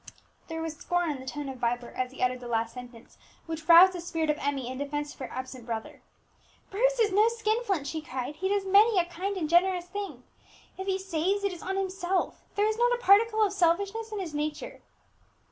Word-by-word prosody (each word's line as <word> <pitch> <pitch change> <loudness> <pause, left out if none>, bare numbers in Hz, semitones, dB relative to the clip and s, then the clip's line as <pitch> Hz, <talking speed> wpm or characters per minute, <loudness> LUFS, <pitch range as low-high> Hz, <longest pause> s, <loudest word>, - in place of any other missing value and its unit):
There 325 -1 -4
was 320 -1 -5
scorn 350 -2 0
in 280 - -5
the 260 - -11
tone 290 +2 -4
of 265 -2 -7
Vibert 240 0 -2
as 255 0 -1
he 265 - -4
uttered 250 0 +1
the 245 - -8
last 230 -1 -1
sentence, 245 -2 -12 0.3
which 320 -1 -6
roused 355 +3 +9
the 355 - -5
spirit 325 -2 -1
of 300 - -4
Emmie 275 -3 -2
in 260 +1 -5
defence 290 +1 -3
of - - -22
her 260 - -5
absent 255 -1 -7
brother. 225 -1 -5 0.7
"Bruce - - +2
is 430 -3 +3
no 420 +3 +5
skin 460 0 0
flint!" 380 -11 -1
she 315 +2 -4
cried; 265 -1 -5
"he 380 +2 -1
does 400 -1 0
many 405 +3 +5
a 350 - +4
kind 370 +3 -4
and 325 -4 -1
generous 355 +2 +3
thing. 360 -9 -6 0.5
If 380 +1 -6
he 380 -1 +1
saves, 385 +1 -1
it 400 -2 0
is 350 - -10
on 385 +1 -3
himself; 380 -1 -1
there 410 0 +2
is 435 +1 -1
not 485 0 +4
a 485 - -9
particle 435 +2 +5
of 400 -2 +1
selfishness 400 +5 +1
in 425 - -4
his 345 -5 -5
nature!" 300 0 -4
345 Hz, 225 wpm, -28 LUFS, 285-395 Hz, 0.7 s, roused